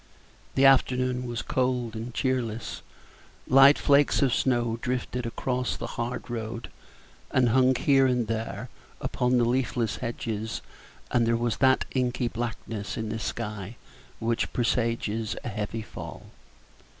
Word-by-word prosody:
The 135 - +5
afternoon 125 -1 +3
was 120 -1 -3
cold 125 -3 0
and 115 +2 -5
cheerless; 120 -3 -2 0.6
light 135 +2 +7
flakes 140 0 +4
of 130 -4 +3
snow 120 -3 +1
drifted 125 -1 -2
across 125 +2 -2
the - - -5
hard 120 +2 -3
road, 115 -1 -5 0.6
and 125 -2 +3
hung 130 +2 +4
here 135 +1 +4
and 125 -2 +1
there 115 +1 -4 0.3
upon 125 0 +1
the 120 - +3
leafless 120 -3 0
hedges, 110 -2 -4 0.5
and 120 -2 +3
there 115 0 +3
was 120 -1 -1
that 130 -1 +4
inky 125 -1 0
blackness 115 -3 -4
in 110 -1 -3
the 110 +1 -3
sky 105 0 -4 0.4
which 115 +1 -1
presages 115 -2 0
a - - -3
heavy 110 +1 -4
fall. - - -9
120 Hz, 135 wpm, -27 LUFS, 115-125 Hz, 0.6 s, light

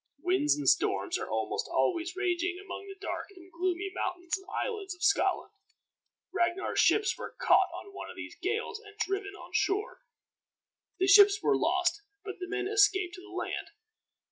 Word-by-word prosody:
Winds 325 -2 +2
and 295 - -3
storms - - +2
are - - -5
almost - - -2
always 350 +1 0
raging 360 -1 0
among 395 0 -8
the 390 - -8
dark 400 - -4
and 365 0 -15
gloomy 365 +3 -2
mountains 355 -2 -2
and 385 0 -11
islands 400 -4 -3
of 355 - -10
Scotland. 400 - +2 0.8
Ragnar's 350 +1 0
ships 430 -1 +4
were - - -7
caught - - +4
on 400 - -9
one - - -7
of - - -9
these - - -8
gales 435 +3 -2
and 415 0 -15
driven 395 -1 -2
on 350 -2 -12
shore. 405 +6 0 1.0
The 375 - +2
ships 400 +1 +7
were - - +4
lost, - - +1 0.2
but 395 -2 -6
the 360 - -5
men 395 -1 -2
escaped 390 -4 +3
to 365 - -9
the 395 - -14
land. 365 - -4
380 Hz, 170 wpm, -30 LUFS, 360-400 Hz, 1.0 s, ships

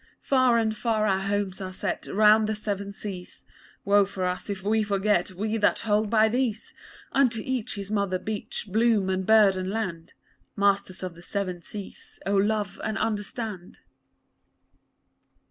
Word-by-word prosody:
Far 255 -3 +4
and 220 -1 +1
far 215 -1 0
our 190 -2 +2
homes 200 -1 -2
are 185 -1 -5
set 185 - -3
round 215 +1 +5
the 220 - 0
Seven 200 -1 -4
Seas; 195 -3 -8 0.4
Woe 200 +1 +5
for 190 -1 -3
us 180 +3 -3
if 195 -2 -4
we 220 +2 +2
forget, 200 -3 +1
we 215 +4 -2
that 210 - +2
hold 210 -1 +1
by 220 0 +4
these! 230 -1 -2 0.4
Unto 250 -5 +3
each 255 -5 -2
his 200 0 -6
mother 200 -3 0
beach, 210 +4 -5
bloom 215 -2 +2
and 185 0 -2
bird 215 -3 +6
and 185 0 -3
land 185 -6 -4 0.4
Masters 200 -2 +1
of 180 -2 -4
the 170 - -14
Seven 185 -1 -3
Seas, 200 +2 -10
oh, 200 - 0
love 205 0 0
and 215 0 -1
understand. 210 -3 -3
205 Hz, 160 wpm, -26 LUFS, 190-220 Hz, 0.4 s, bird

